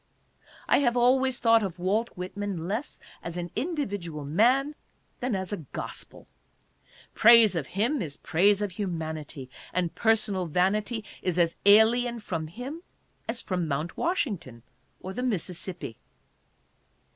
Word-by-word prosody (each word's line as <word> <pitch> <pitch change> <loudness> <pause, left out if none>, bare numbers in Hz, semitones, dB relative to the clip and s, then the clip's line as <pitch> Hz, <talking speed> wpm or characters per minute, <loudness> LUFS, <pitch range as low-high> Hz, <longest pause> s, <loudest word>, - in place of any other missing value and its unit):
I - - +4
have 245 -3 +2
always 255 +1 +3
thought 230 -1 +4
of 190 -4 -3
Walt 205 +6 0
Whitman 185 -2 -4
less 220 +9 -3 0.2
as 170 +1 -5
an 175 -1 -4
individual 205 - -3
man 250 - +3 0.5
than 245 -3 -1
as 190 0 -3
i - - -1 0.2
gospel. - - -6 0.9
Praise 230 -3 +7
of 155 -6 -2
him 240 +6 +1
is 145 -6 -5
praise 200 +5 +2
of 205 - -2
humanity, 160 -7 -5 0.2
and 175 -2 -1
personal 215 -5 +1
vanity 210 +7 0 0.2
is 180 -2 -1
as 170 -1 +3
alien 235 +3 +5
from 165 -7 -4
him 255 - -7 0.5
as 230 +1 -2
from 180 -3 -2
Mt. 155 +3 -2
Washington 190 - -2 0.4
or 190 - -6
the 250 - -3
Mississippi. 185 - -3
200 Hz, 135 wpm, -27 LUFS, 170-235 Hz, 0.9 s, Praise